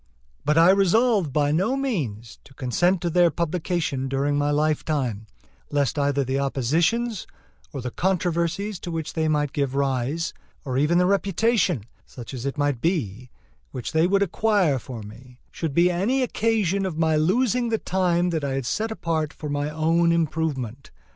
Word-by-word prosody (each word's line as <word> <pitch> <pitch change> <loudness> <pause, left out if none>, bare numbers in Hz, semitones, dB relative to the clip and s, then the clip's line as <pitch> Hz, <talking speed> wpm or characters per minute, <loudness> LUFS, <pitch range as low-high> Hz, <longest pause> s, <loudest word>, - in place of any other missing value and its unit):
But 150 +1 +1
I 165 +3 +7
resolved 195 - +3
by 145 +1 +1
no 190 - +1
means 135 - -3
to 135 - -18
consent 175 +9 +1
to 175 - -1
their 175 0 +5
publication 165 -4 -2
during 140 +2 0
my 145 0 +1
lifetime, 145 -7 -1 0.4
lest 145 0 0
either 140 0 +1
the 135 +1 -1
oppositions 165 - 0 0.4
or 140 -4 -5
the 125 0 -4
controversies 180 - -1
to - - -7
which 165 -2 -4
they 160 -1 0
might 150 -2 0
give 140 -2 -1
rise, 140 +3 -1 0.3
or 130 -2 -3
even 150 +6 +2
the 180 - +4
reputation, 195 - +1 0.2
such 120 +1 -10
as 130 +1 -4
it 140 - -4
might 145 -4 0
be, 125 - -2 0.4
which 125 -3 -6
they 160 +2 +3
would 200 +1 +3
acquire 195 -7 +1
for 120 -3 -8
me, 120 +4 -13
should 160 -4 -4
be 175 +1 +4
any 225 +10 +1
occasion 210 -5 0
of 185 -5 -3
my 160 -1 +2
losing 235 +9 +2
the 225 - +1
time 180 -3 0
that 160 -3 -2
I 140 -1 -1
had 135 -2 -2
set 215 - -1
apart 160 -8 -2
for 150 - -7
my 145 +1 -1
own 165 +2 +2
improvement. 150 -6 -2
160 Hz, 170 wpm, -24 LUFS, 140-180 Hz, 0.4 s, I